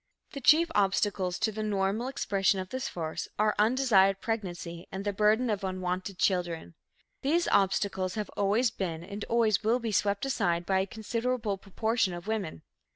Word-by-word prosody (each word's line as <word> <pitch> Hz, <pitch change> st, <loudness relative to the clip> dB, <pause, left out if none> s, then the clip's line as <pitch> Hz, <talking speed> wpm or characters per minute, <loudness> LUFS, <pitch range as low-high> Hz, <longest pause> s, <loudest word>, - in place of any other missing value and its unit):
The 280 Hz, -, -7 dB
chief 320 Hz, +6 st, +5 dB
obstacles 195 Hz, -2 st, +1 dB
to 220 Hz, -, 0 dB
the 215 Hz, +1 st, -5 dB
normal 210 Hz, +2 st, 0 dB
expression 200 Hz, -7 st, +1 dB
of 185 Hz, 0 st, -5 dB
this 260 Hz, 0 st, -3 dB
force 160 Hz, -2 st, -4 dB
are 215 Hz, 0 st, +3 dB
undesired 210 Hz, -4 st, +4 dB
pregnancy 175 Hz, -6 st, -4 dB
and 195 Hz, +1 st, -5 dB
the 205 Hz, -, 0 dB
burden 215 Hz, +5 st, +3 dB
of 210 Hz, -3 st, -1 dB
unwanted 185 Hz, 0 st, -3 dB
children. 175 Hz, -, 0 dB, 0.5 s
These 330 Hz, +5 st, +1 dB
obstacles 190 Hz, -1 st, +1 dB
have 210 Hz, -1 st, -4 dB
always 210 Hz, +4 st, +1 dB
been 170 Hz, -4 st, -4 dB
and 200 Hz, +3 st, -6 dB
always 225 Hz, -3 st, +2 dB
will 225 Hz, +3 st, +3 dB
be 230 Hz, -3 st, -3 dB
swept 200 Hz, +2 st, +1 dB
aside 175 Hz, -10 st, 0 dB
by 190 Hz, 0 st, +2 dB
a 190 Hz, -, -1 dB
considerable 225 Hz, 0 st, -2 dB
proportion 220 Hz, -1 st, 0 dB
of 175 Hz, -, -8 dB
women. 205 Hz, -, -3 dB
200 Hz, 165 wpm, -29 LUFS, 185-225 Hz, 0.5 s, chief